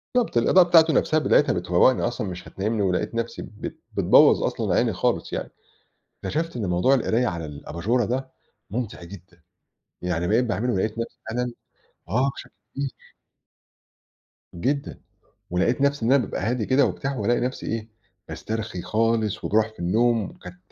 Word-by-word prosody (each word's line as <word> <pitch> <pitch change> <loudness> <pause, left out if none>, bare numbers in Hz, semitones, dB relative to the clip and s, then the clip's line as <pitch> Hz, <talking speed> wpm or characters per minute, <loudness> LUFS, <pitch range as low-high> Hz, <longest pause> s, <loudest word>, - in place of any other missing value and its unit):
بالضبط، 240 - +1
الإضاءة 180 +9 +5
بتاعته 165 -2 +6
نفسها 155 - +2
بتاعتها 150 - +3
بتفوّقني 90 +8 +3
أصلًا، 120 -3 -2
مش 90 -1 -7
هتنيّمني 105 +3 -2
ولقيت 95 +3 0
نفسي 115 0 -3
بت 105 - -8
بتبوَّظ - - +5
أصلًا - - -1
عيني - - +2
خالص - - -1
يعني، - - -4 0.7
اكتشفت 165 -1 -2
إن 110 -5 -2
موضوع 90 +10 +3
القراية 125 -1 +1
على 85 -6 -3
الأباجُورة 85 - -2
ده 130 +4 -3 0.4
مُمتع 115 -6 -4
جدًا، 85 -2 -13 0.6
يعني 90 -1 -1
بقيت 115 +4 +3
باعمله 120 +3 -1
ولقيت 105 +2 0
نفسي 120 +2 -5
فعلًا 125 +2 -2 0.6
آه، 125 +8 +2
بشكل - - -10 0.2
كبير. 140 -1 -2 1.6
جدًا، 140 +11 -2 0.5
ولقيت 95 +9 +1
نفسي 140 -3 +1
إن 125 - +3
أنا 135 -3 +4
بابقى - - -5
هادي 115 0 -1
كده 135 +2 +4
وبتاع 135 0 -3
وألاقي 120 +3 +1
نفسي 130 +1 -3
إيه، 115 0 -3 0.4
باسترخي 110 -5 -5
خالص 110 -1 0
وباروح 110 +1 +2
في - - -25
النَّوم، 115 +5 +2
وكانت 90 0 -12
115 Hz, 155 wpm, -24 LUFS, 95-125 Hz, 1.6 s, بتاعته